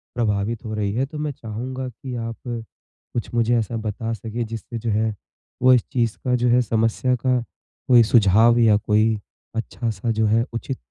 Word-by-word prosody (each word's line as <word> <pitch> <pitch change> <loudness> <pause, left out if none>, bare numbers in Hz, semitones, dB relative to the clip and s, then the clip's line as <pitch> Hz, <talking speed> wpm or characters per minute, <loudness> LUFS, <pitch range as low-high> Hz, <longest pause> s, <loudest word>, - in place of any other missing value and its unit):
प्रभावित 110 0 -1
हो 110 - -4
रही 105 -2 -1
है, 130 +4 +1
तो 150 +2 -9
मैं 150 -1 -2
चाहूँगा 130 +3 -5
कि 125 +2 -8
आप 115 -1 -4
कुछ 120 0 -7
मुझे 120 0 +2
ऐसा 115 +1 -2
बता 110 +1 -3
सकें 115 +2 -4
जिससे 115 +1 -6
जो 115 0 -3
है 110 +1 +1 0.5
वो 130 0 +7
इस 120 - +4
चीज़ 115 -4 0
का 125 0 +2
जो 120 0 +1
है 125 +1 +5
समस्या 115 +3 +1
का 125 -1 +3 0.5
कोई 120 -2 +7
सुझाव 115 +2 +6
या 110 -3 +5
कोई 110 +1 +2 0.4
अच्छा-सा 115 -1 -2
जो 110 0 +1
है 115 +3 +3
उचित 130 +3 -4
115 Hz, 180 wpm, -22 LUFS, 110-120 Hz, 0.5 s, वो